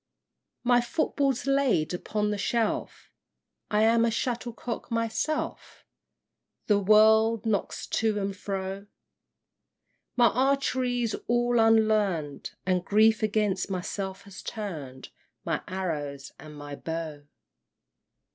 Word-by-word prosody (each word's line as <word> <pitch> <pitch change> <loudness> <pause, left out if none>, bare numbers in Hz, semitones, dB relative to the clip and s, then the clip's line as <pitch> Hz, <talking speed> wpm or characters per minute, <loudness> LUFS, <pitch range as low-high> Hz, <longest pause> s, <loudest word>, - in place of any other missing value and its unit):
VI. - - -8
My 245 0 +6
football's 275 0 0
laid 270 - +2
upon 210 +3 -1
the 210 - -2
shelf; 225 +1 -2 0.6
I 210 +1 +2
am 230 +1 +4
a 230 - +3
shuttlecock 240 0 -3
myself 230 +7 -3 0.8
The 205 -2 +3
world 220 +2 +5
knocks 215 -3 -1
to 220 -2 0
and 195 0 -2
fro; 195 0 -5 1.3
My 240 -2 +5
archery 255 -1 +1
is 225 - -1
all 240 0 +2
unlearn'd, 215 -10 +2 0.2
And 185 -1 +1
grief 220 +3 +4
against 210 -3 0
myself 190 +1 -4
has 200 -1 -11
turn'd 150 -12 -6 0.4
My - - -1
arrows 150 -7 -4
and 155 -1 -11
my 145 0 -7
bow! 160 -2 -5
215 Hz, 110 wpm, -27 LUFS, 190-235 Hz, 1.3 s, My